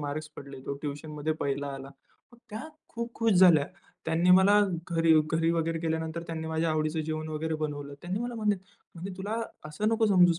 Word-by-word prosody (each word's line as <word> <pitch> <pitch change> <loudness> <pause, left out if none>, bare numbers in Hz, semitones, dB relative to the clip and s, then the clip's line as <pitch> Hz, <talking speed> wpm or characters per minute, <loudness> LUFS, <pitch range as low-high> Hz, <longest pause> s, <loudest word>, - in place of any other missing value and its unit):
Marks 150 +1 -4
पडले. 140 -1 -9
तो 140 - -2
ट्युशनमध्ये 150 +1 -3
पहिला 140 0 -1
आला." 135 0 -8 0.4
मग 240 - -17
त्या 220 +9 -6 0.2
खूप 235 0 -5
खुश 230 -1 +2
झाल्या. 175 -6 +6 0.4
त्यांनी 170 +3 +2
मला 190 +3 +7 0.3
घरी 165 -1 +4 0.2
घरी 165 +1 +3
वगैरे 165 0 0
गेल्यानंतर 160 0 -2
त्यांनी 160 -1 -4
माझ्या 160 0 0
आवडीचं 155 +1 0
जेवण 155 0 -3
वगैरे 160 +1 -2
बनवलं. 145 -2 -4
त्यांनी 180 +3 -2
मला 240 0 -3
म्हणे 210 -3 +1 0.4
म्हणे, 180 +3 -6
"तुला 215 +4 -2 0.3
असं 205 +8 -1
नको 225 0 +3
समजूच 180 -4 +5
160 Hz, 180 wpm, -29 LUFS, 155-190 Hz, 0.4 s, मला